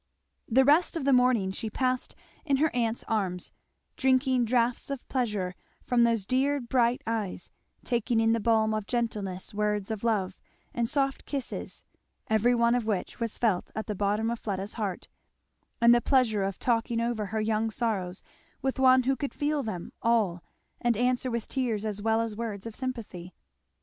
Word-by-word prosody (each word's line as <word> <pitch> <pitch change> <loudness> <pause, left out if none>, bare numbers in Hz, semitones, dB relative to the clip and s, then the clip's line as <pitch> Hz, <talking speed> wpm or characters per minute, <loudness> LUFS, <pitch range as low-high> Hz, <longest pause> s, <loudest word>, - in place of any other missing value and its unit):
The 260 +3 +5
rest 320 +4 +4
of 290 - -3
the 280 - +4
morning 250 -6 +3
she 220 +3 -4
passed 255 +2 -1 0.3
in 280 -3 +2
her 305 -1 +1
aunt's 230 -1 0
arms; 190 -5 -1 0.4
drinking 260 -2 +2
draughts 240 +2 +1
of 275 -2 -5
pleasure 210 -8 -1 0.3
from 245 -1 +3
those 230 -4 +1
dear 275 +5 +1
bright 240 -1 +1
eyes; 215 -6 -3 0.3
taking 240 -1 0
in 225 0 +3
the 230 - +1
balm 220 -1 +2
of 215 -1 -3
gentlest 210 -5 -3
words 210 0 -1
of 220 -1 -4
love, 200 -5 0 0.3
and 235 -1 0
soft 275 -1 -1
kisses, 275 -3 -5 0.5
every 230 +3 +4
one 235 0 +3
of 245 -3 0
which 205 -4 -2
was 230 -2 -3
felt 210 -7 +1
at 220 - -3
the 210 - -3
bottom 210 +3 0
of 235 - -3
Fleda's 195 -1 -4
heart, 200 -5 -4 0.7
and 235 0 +7
the 240 - +4
pleasure 240 -7 +2
of 195 -1 -2
talking 230 -1 0
over 230 -3 -1
her 220 +2 -2
young 220 +1 0
sorrows 205 -6 -2 0.4
with 265 0 -2
one 260 -1 +6
who 270 +2 +2
could 280 +1 -4
feel 295 0 0
them 185 -8 -5
all 215 -7 +2 0.4
and 240 -3 +2
answer 250 +2 +1
with 235 -2 -3
tears 230 -6 -1
as 210 -1 -3
well 225 +1 +2
as 225 -2 -3
words 215 -3 -5
of 225 -2 -6
sympathy. 225 -9 -6
230 Hz, 175 wpm, -28 LUFS, 210-250 Hz, 0.7 s, and